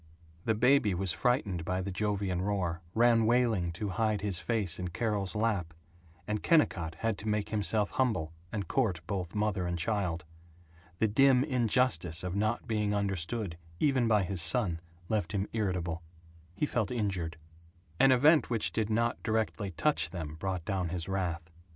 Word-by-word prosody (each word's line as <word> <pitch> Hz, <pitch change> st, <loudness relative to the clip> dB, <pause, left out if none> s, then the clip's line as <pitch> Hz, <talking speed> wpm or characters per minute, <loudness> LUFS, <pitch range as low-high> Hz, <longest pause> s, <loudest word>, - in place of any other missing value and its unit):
The 110 Hz, -, +2 dB
baby 125 Hz, -3 st, +4 dB
was 95 Hz, 0 st, 0 dB
frightened 105 Hz, -9 st, 0 dB
by 90 Hz, +2 st, -1 dB
the 95 Hz, +1 st, -3 dB
Jovian 100 Hz, -2 st, -1 dB
roar; 90 Hz, -4 st, -1 dB
ran 115 Hz, -1 st, +4 dB
wailing 115 Hz, -7 st, +2 dB
to 100 Hz, +4 st, -3 dB
hide 105 Hz, +2 st, 0 dB
his 100 Hz, -3 st, -1 dB
face 100 Hz, -7 st, -1 dB
in 90 Hz, -, -3 dB
Carol's 100 Hz, +2 st, -2 dB
lap; 100 Hz, -7 st, -1 dB, 0.5 s
and 105 Hz, 0 st, -2 dB
Kennicott 85 Hz, -, +2 dB
had 115 Hz, 0 st, 0 dB
to 110 Hz, -, -7 dB
make 105 Hz, -1 st, 0 dB
himself 105 Hz, 0 st, +1 dB
humble 110 Hz, -, 0 dB, 0.2 s
and 100 Hz, -3 st, -3 dB
court 105 Hz, -12 st, 0 dB
both 90 Hz, -1 st, -4 dB
mother 105 Hz, -4 st, 0 dB
and 90 Hz, 0 st, -2 dB
child. 90 Hz, -1 st, -1 dB, 0.7 s
The 110 Hz, -, +2 dB
dim 130 Hz, +4 st, +5 dB
injustice 120 Hz, -, +1 dB
of 90 Hz, 0 st, -3 dB
not 110 Hz, +4 st, 0 dB
being 105 Hz, -2 st, 0 dB
understood 100 Hz, -1 st, -2 dB, 0.2 s
even 135 Hz, -5 st, +2 dB
by 105 Hz, -3 st, +3 dB
his 95 Hz, -1 st, -1 dB
son 85 Hz, +1 st, +2 dB, 0.3 s
left 110 Hz, 0 st, -1 dB
him 100 Hz, 0 st, -1 dB
irritable. 90 Hz, -6 st, -1 dB, 0.5 s
He 125 Hz, -, 0 dB
felt 120 Hz, -7 st, -1 dB
injured. 95 Hz, -8 st, -2 dB, 0.6 s
An 135 Hz, -, +6 dB
event 145 Hz, +5 st, +5 dB
which 115 Hz, -3 st, +1 dB
did 110 Hz, -1 st, -1 dB
not 115 Hz, +2 st, 0 dB
directly 110 Hz, -2 st, -1 dB
touch 150 Hz, -, +1 dB
them 80 Hz, -5 st, -5 dB
brought 95 Hz, -2 st, -3 dB
down 95 Hz, -4 st, -1 dB
his 85 Hz, 0 st, -4 dB
wrath. 85 Hz, -4 st, -3 dB
100 Hz, 165 wpm, -31 LUFS, 90-115 Hz, 0.7 s, An